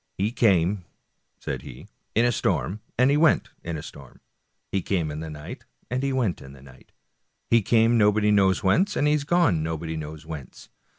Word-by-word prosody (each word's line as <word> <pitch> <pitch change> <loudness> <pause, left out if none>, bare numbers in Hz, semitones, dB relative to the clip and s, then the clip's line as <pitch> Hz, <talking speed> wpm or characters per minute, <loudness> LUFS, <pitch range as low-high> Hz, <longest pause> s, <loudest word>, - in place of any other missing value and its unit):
" - - -50
He 100 +3 0
came," 100 -5 +2 0.5
said - - -5
he, - - -11
" - - -49
in 115 - +4
a 120 - +3
storm, 105 -3 -1 0.2
and 130 +3 +4
he 145 - +3
went 155 0 +3
in 80 -1 -4
a 75 - -7
storm; 70 -4 -12 0.5
he 100 - 0
came 85 -5 -1
in 75 - -5
the 80 0 -6
night, 75 -1 -9 0.3
and 125 +1 -1
he 140 0 -1
went 120 -10 -1
in 65 0 -12
the 70 -1 -15
night; 65 -1 -17 0.6
he 115 0 +5
came 115 +2 +3
nobody 105 0 +3
knows 95 -2 +3
whence, 175 - +2
and - - +1
he 150 - +3
has 150 -2 0
gone 150 - +2
nobody 80 0 -4
knows 80 0 -7
where. 75 -6 -7
95 Hz, 210 wpm, -25 LUFS, 80-120 Hz, 0.6 s, he